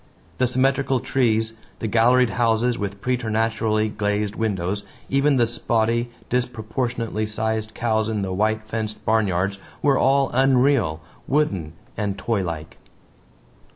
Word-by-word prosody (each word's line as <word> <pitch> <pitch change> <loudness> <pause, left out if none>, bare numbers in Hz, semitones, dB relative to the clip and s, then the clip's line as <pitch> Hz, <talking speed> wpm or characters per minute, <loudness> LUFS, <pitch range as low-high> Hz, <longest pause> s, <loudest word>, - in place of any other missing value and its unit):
The 130 - +3
symmetrical 135 +1 +2
trees, 115 -3 +1 0.2
the - - -5
galleried 120 +3 +4
houses 120 +1 +2
with 100 -2 -5
preternaturally 115 -3 0
glazed 105 0 -1
windows, 100 -3 -1 0.3
even 140 +1 +3
the 120 -2 +4
spotty, 115 0 0 0.2
disproportionately 115 -2 -2
sized 110 0 -2
cows 110 -2 0
in 105 -3 -1
the 95 -1 -3
white 110 +3 +1
fenced 110 -1 -5
barnyards 100 -3 +1 0.2
were 140 -2 +4
all 135 0 +3
unreal, 130 - +3 0.3
wooden 100 - 0 0.2
and 100 -2 -2
toylike. 85 -9 -3
110 Hz, 120 wpm, -23 LUFS, 105-125 Hz, 0.3 s, galleried